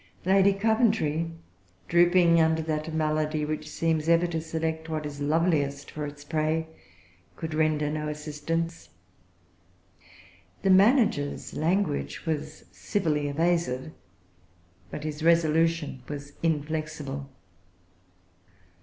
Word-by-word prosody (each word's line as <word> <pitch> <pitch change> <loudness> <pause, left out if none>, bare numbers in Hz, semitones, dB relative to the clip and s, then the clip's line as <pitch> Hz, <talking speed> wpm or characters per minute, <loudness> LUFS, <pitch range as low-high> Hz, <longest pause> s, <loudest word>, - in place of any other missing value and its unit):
Lady 195 +1 +5
Coventry, 200 - +1 0.6
drooping 170 -1 +5
under 160 0 +2
that 155 0 -2
malady 155 -1 0
which 155 0 -4
seems 160 -1 0
ever 170 +1 +5
to 165 -2 -2
select 160 0 -3
what 155 -1 -3
is 145 -1 -6
loveliest 145 -2 0
for 150 -1 -4
its 145 0 -10
prey, 155 +1 0 0.7
could 160 -1 -5
render 155 -1 +1
no 150 0 -2
assistance. 155 +2 -4 1.7
The 195 - +4
manager's 195 - +3
language 155 - -1
was 155 -1 -4
civilly 155 -7 -1
evasive; 155 -2 0 1.0
but 145 - -6
his 155 0 -5
resolution 165 -3 +2
was 145 -1 -7
inflexible. 150 -3 -2
155 Hz, 100 wpm, -27 LUFS, 150-165 Hz, 1.7 s, Lady